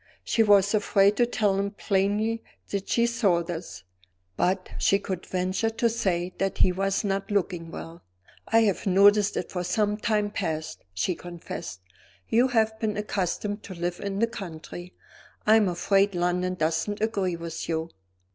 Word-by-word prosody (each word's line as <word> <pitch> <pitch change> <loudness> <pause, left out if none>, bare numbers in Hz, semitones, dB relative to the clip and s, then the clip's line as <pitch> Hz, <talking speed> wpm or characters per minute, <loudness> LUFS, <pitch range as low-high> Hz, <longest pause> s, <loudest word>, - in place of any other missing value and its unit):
She 230 - +1
was 205 -1 +5
afraid 205 -1 +3
to 240 - +4
tell 205 -4 +1
him 200 0 0
plainly 205 +3 0 0.3
that 200 -1 -3
she 235 - +3
saw 200 -8 +2
this; 165 - -7 0.5
but 185 - 0
she 195 - +4
could 190 -3 -5
venture 185 +4 0
to 230 +1 +1
say 185 -5 -1
that 195 -1 -1
he 185 - +4
was 195 +3 0
not 195 -1 -1
looking 180 -4 -1
well. 165 0 -9 0.5
"I 225 0 +4
have 205 -2 +1
noticed 200 +2 +5
it 180 - -3
for 180 -1 -2
some 210 +3 0
time 210 -1 0
past," 160 -6 -3
she 95 - -1
confessed. 170 - -8 0.5
"You 240 +3 +4
have 220 -3 +1
been 215 -2 -1
accustomed 205 0 -2
to 185 - -9
live 175 +1 -3
in 200 -1 -3
the 230 - +3
country; 175 -4 -8 0.5
I 215 - +6
am 215 -3 +4
afraid 195 +3 +2
London 180 +1 0
doesn't 165 +5 -1
agree 200 -5 0
with 170 0 -6
you." 160 0 -2
195 Hz, 165 wpm, -26 LUFS, 175-210 Hz, 0.5 s, I